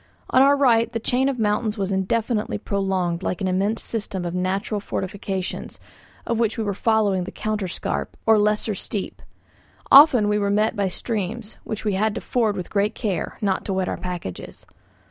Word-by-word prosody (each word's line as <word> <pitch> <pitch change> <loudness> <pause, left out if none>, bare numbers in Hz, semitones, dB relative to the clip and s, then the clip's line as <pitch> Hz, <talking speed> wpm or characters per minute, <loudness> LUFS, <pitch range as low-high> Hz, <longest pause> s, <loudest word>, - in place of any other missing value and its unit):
On 260 - +5
our 280 +1 +5
right 235 -4 +3
the 230 - -2
chain 255 +4 +1
of 270 - -2
mountains 215 0 0
was 195 -1 -2
indefinitely 210 +4 0
prolonged 190 -4 -1
like 180 - -2
an 190 - -1
immense 195 +4 0
system 200 -5 -4
of 175 - -3
natural 190 +3 -1
fortifications, 195 -1 -4 0.5
of 230 -1 -1
which 230 0 +1
we 225 - -1
were 205 -1 -1
following 205 -3 +1
the - - -7
counter 215 -3 -2
scarp 175 - -4
or 220 -1 +5
lesser 210 +1 +1
steep; 200 +1 -5 0.7
often 270 -6 +8
we 210 0 +2
were 200 -1 0
met 215 +3 +2
by 200 -2 0
streams, 215 +2 -4
which 220 0 -5
we 210 - +1
had 210 +2 +1
to - - -4
ford 220 -5 0
with 180 - -6
great 205 +1 +1
care, 195 -8 -3
not 195 -2 0
to 195 - -2
wet 190 -1 0
our - - -2
packages. 175 - -7
210 Hz, 185 wpm, -23 LUFS, 190-225 Hz, 0.7 s, often